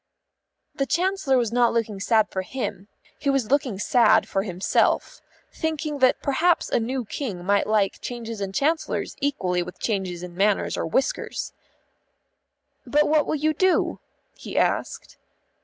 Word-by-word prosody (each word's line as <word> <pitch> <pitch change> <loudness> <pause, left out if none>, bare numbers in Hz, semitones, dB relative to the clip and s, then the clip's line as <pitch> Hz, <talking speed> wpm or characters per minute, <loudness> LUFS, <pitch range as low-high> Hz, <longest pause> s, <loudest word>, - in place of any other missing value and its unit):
The 275 -2 -2
Chancellor 350 -2 +1
was 235 -3 0
not 240 0 +3
looking 220 -4 -1
sad 220 +1 +3
for 190 - -2
him; 205 -2 -5 0.3
he 280 - -1
was 270 -4 0
looking 275 -8 +1
sad 220 +1 +4
for 195 - 0
himself, 190 -1 0 0.3
thinking 310 -2 -3
that 255 -1 +3
perhaps 325 +5 +2
a - - +3
new 250 +2 -2
King 200 -7 -5
might 200 +1 +2
like 210 -2 +1
changes 230 -3 -6
in 195 -1 -3
Chancellors 310 +10 -1
equally 185 -11 0
with 180 +1 -7
changes 185 -5 -2
in 180 -1 -8
manners 200 +3 +1
or - - -2
whiskers. 265 +11 -2 1.3
"But 295 +1 +2
what 305 0 +3
will - - 0
you 310 +1 +1
do?" 370 +4 +1 0.4
he - - -7
asked. - - -1
240 Hz, 150 wpm, -24 LUFS, 200-285 Hz, 1.3 s, sad